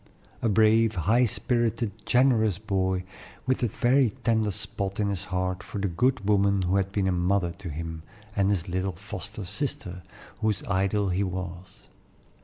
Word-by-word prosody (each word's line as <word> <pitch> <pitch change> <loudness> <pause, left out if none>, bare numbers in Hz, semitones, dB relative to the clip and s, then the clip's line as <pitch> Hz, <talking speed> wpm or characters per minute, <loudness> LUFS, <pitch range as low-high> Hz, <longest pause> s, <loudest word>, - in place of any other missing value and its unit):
A 115 - +2
brave, 110 +1 +4
high 110 +9 +3
spirited, 115 0 0 0.2
generous 115 -7 +3
boy, 95 -3 -1 0.4
with 130 +1 +1
a 120 - +2
very 125 +3 +3
tender 110 -2 +2
spot 100 -1 -3
in 105 -1 +1
his 100 -1 -3
heart 95 0 -2
for 105 - -7
the 100 0 0
good 115 +4 +1
woman 100 -2 +3
who 90 +2 +2
had 95 0 0
been 100 -1 0
a - - +2
mother 90 0 +1
to 95 -4 -6
him, 80 +1 -5 0.3
and 100 -1 +2
his 95 -3 0
little 95 +1 -1
foster 100 +3 -7
sister, 130 -7 -3 0.4
whose 110 +5 0
idol 100 -3 +1
he 90 +2 0
was. 90 -1 -6
100 Hz, 165 wpm, -27 LUFS, 95-110 Hz, 0.4 s, brave